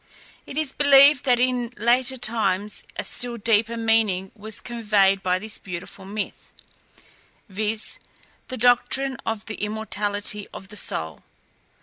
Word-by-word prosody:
It 275 - -8
is 310 -4 0
believed 280 -1 +6
that 245 -2 +3
in 250 -1 +1
later 245 +4 +2
times 210 -4 -1
a - - -3
still 245 -1 -2
deeper 230 +1 +1
meaning 220 -5 +1
was 215 0 -2
conveyed 205 -5 +1
by 180 -1 +1
this 215 +2 -2
beautiful 185 +1 -8
myth, 205 +1 -6 1.0
viz., 215 +2 -2 0.5
the 255 - -6
doctrine 250 +2 +2
of 220 -1 -3
the 215 - -7
immortality 210 -1 -2
of 195 - -10
the 210 - -8
soul. 80 - -2
220 Hz, 130 wpm, -23 LUFS, 205-245 Hz, 1.0 s, believed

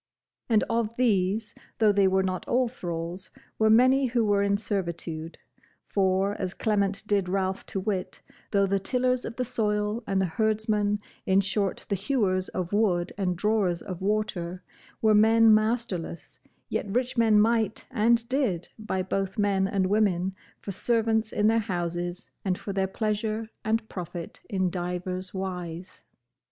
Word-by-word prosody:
And 220 -2 +4
of 230 -1 -1
these, 215 -2 +1 0.2
though 215 -2 +5
they 200 -1 +4
were 190 0 +2
not 185 -1 -3
all 250 0 +2
thralls, 175 -5 -5 0.3
were 220 0 +4
many 255 +4 +5
who 235 -2 +1
were 205 -1 +3
in 200 0 +2
servitude: 170 -5 -4 0.5
for, 195 0 +1
as 185 -1 -3
Clement 200 -2 0
did 200 -3 +1
Ralph 190 0 -1
to 195 - -3
wit, 190 -1 -3 0.3
though 200 -1 +3
the 195 0 +1
tillers 250 +4 0
of 230 - -6
the 250 - -1
soil, 210 0 -1
and 195 -1 +1
the 190 - +2
herdsmen, 210 +2 0 0.3
in 190 +1 +4
short 195 0 -1
the - - -1
hewers 195 -3 0
of 180 0 -4
wood 190 -5 +1
and 185 -3 -1
drawers 195 -3 +1
of 185 -2 -6
water, 190 -4 -1 0.4
were 215 -1 +5
men 220 +1 +6
masterless, 215 -8 -1 0.3
yet 220 - -2
rich 250 +4 0
men 225 -3 +5
might 220 -1 +2
and 235 0 +3
did 245 - 0
buy 190 -4 -2
both 195 0 -2
men 200 -2 +2
and 195 -1 +1
women 190 -2 +1 0.3
for 200 - -6
servants 220 +1 +1
in 210 - +1
their 225 +1 +4
houses, 175 -3 -3
and 185 -2 0
for 200 - -5
their 190 0 +1
pleasure 215 +2 -2
and 220 0 0
profit 175 -3 -7
in 190 -4 0
divers 180 +1 -3
wise. 180 -2 -6
200 Hz, 155 wpm, -27 LUFS, 185-220 Hz, 0.5 s, men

